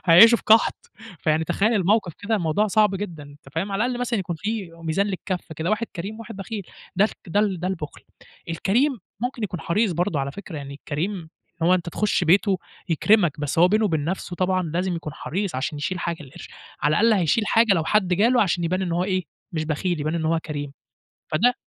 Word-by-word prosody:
هيعيشوا 225 +8 +9
في - - -16
قَحْط. 230 - +4 0.3
فيعني 155 +1 +1
تخيَّل 205 +7 +1
الموقف 195 -2 +2
كده، 220 +2 -1
الموضوع 180 +3 +1
صعب 210 -1 +3
جدًا، 175 -6 -5
أنت 145 -1 -14
فاهم؟ 195 +5 -2
على 210 +4 +1
الأقل 245 0 -2
مثلًا 240 -3 0
يكون 175 -3 -3
فيه 195 -6 -4
ميزان 165 +5 +1
للكف 185 -3 -4
كده، 160 +5 -2
واحد 225 +2 0
كريم 195 +6 -4
وواحد 230 -2 -9
بخيل. 200 +1 -5 0.3
ده 205 +3 +5
خ - - -9 0.2
ده 200 +5 +2
ال 195 -5 0
ده 180 - -1
البُخل. 165 -6 -5 0.5
الكريم 240 - +1 0.2
ممكن 245 -2 -3
يكون 180 -4 -3
حريص 200 +3 +1
برضه 170 -3 0
على 140 +1 -3
فكرة. 190 -5 -8
يعني 140 -1 -7
الكريم 160 +4 -4 0.3
هو 180 +2 +5
أنت 175 -2 -2
تخُش 205 0 0
بيته 190 +3 +4 0.3
يكرمك، 170 -3 +3
بس 145 +2 -2
هو 175 +2 +7
بينه 215 +2 +2
وبين 160 -7 0
نفسه 175 0 -3
طبعًا 185 0 +1
لازم 175 +2 -1
يكون 155 -3 -6
حريص 180 +3 -3
عشان 140 +3 -2
يشيل 180 +5 -2
حاجة 170 -2 -3
القرش، 135 - -11 0.3
على 150 +1 +3
الأقل 230 +1 +5
هيشيل 200 +6 +2
حاجة 225 -3 +4
لو 160 -2 0
حد 210 -2 +2
جاله، 235 +7 +4
عشان 175 -3 0
يبان 185 +3 0
إن 175 - -2
هو 175 +2 +1
إيه، 185 -2 -1 0.3
مش 155 -1 -1
بخيل، 160 +2 -1
يبان 155 +2 -1
إن 165 -2 -1
هو 165 +1 +2
كريم. 145 -2 -5 0.6
فده 230 +11 +3
185 Hz, 210 wpm, -24 LUFS, 160-210 Hz, 0.6 s, هيعيشوا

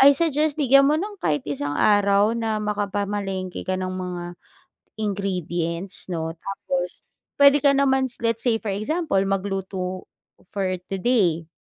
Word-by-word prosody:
I 275 +1 +8
suggest 310 -2 +1
bigyan 275 -1 +5
mo 305 - +3
ng 405 +3 -5
kahit 150 -3 0
isang 145 0 -3
araw 205 +1 +4
na 225 -2 -1
makapamalengke 200 -2 -2
ka 185 - +1
ng 185 0 -3
mga 180 -1 -4 0.7
ingredients, 185 -4 -3
'no, 165 -2 -3
tapos 180 -1 -4 0.4
puwede 280 0 +8
ka 280 - +6
namans, 265 -3 +1
let's 230 -1 0
say 230 -3 +2
for 215 - -5
example, 305 - -1
magluto 190 -1 -3 0.5
for 190 -2 -1 0.2
today. 185 -7 +1
200 Hz, 135 wpm, -23 LUFS, 185-250 Hz, 0.7 s, I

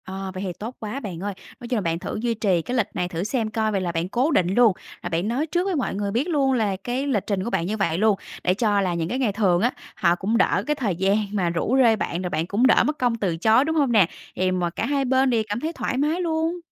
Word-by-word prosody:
Ờ, 190 0 -5
vậy 190 +1 -5
thì 185 -2 -3
tốt 220 +8 -7
quá 220 +5 -4
bạn 190 -10 -6
ơi. 205 0 -2 0.3
Nói 240 - -8
chung 245 -1 0
là - - 0
bạn 165 -2 -1
thử - - -5
duy 235 0 0
trì 200 -6 +1
cái 245 +9 -3
lịch 220 - +2
này 180 -2 -1
thử 175 0 -3
xem 220 +1 -1
coi 220 0 0
vậy 195 -2 0
là 175 -2 -1
bạn 170 +2 -2
cố 255 +9 +1
định 185 - +3
luôn, 240 -4 +5 0.3
là 175 - -4
bạn 170 +3 -1
nói 250 +7 0
trước 350 +3 0
với 385 -2 0
mọi 270 -9 -1
người 200 0 -2
biết 245 - 0
luôn 280 -6 +2
là 215 -6 +1
cái 245 +8 -3
lịch 225 -8 0
trình 195 -3 -1
của 230 - -3
bạn 170 - -1
như 210 +4 -2
vậy 170 -5 0
luôn. 210 0 +3 0.2
Để 180 - +3
cho 205 0 +1
là 185 -2 0
những 170 -1 -2
cái 255 - -2
ngày 245 -6 +1
thường 190 -4 +2
á, 240 +3 +2 0.2
họ 170 0 +2
cũng 200 +5 0
đỡ - - +2
cái 300 - +1
thời 215 -10 -1
gian 195 +3 +2 0.2
mà 185 -4 +1
rủ 175 +9 0
rê 230 -3 +5
bạn 180 -4 -3
rồi 180 - -3
bạn 160 0 -2
cũng 220 +7 +3
đỡ 245 - +5
mất 300 0 -1
công 245 -2 +2
từ 190 -7 -1
chối, 220 - +4
đúng 320 +1 -1
hông 285 -5 +2
nè? 210 -7 +5 0.3
Thì 185 0 +1
mà 180 -1 0
cả - - -3
hai 275 -1 0
bên 260 +1 +3
đều 230 -3 +2
cảm 205 +2 -1
thấy 320 +5 -3
thoải 255 - -3
mái 305 +6 +1
luôn. 330 +1 -1
215 Hz, 300 wpm, -23 LUFS, 185-255 Hz, 0.3 s, luôn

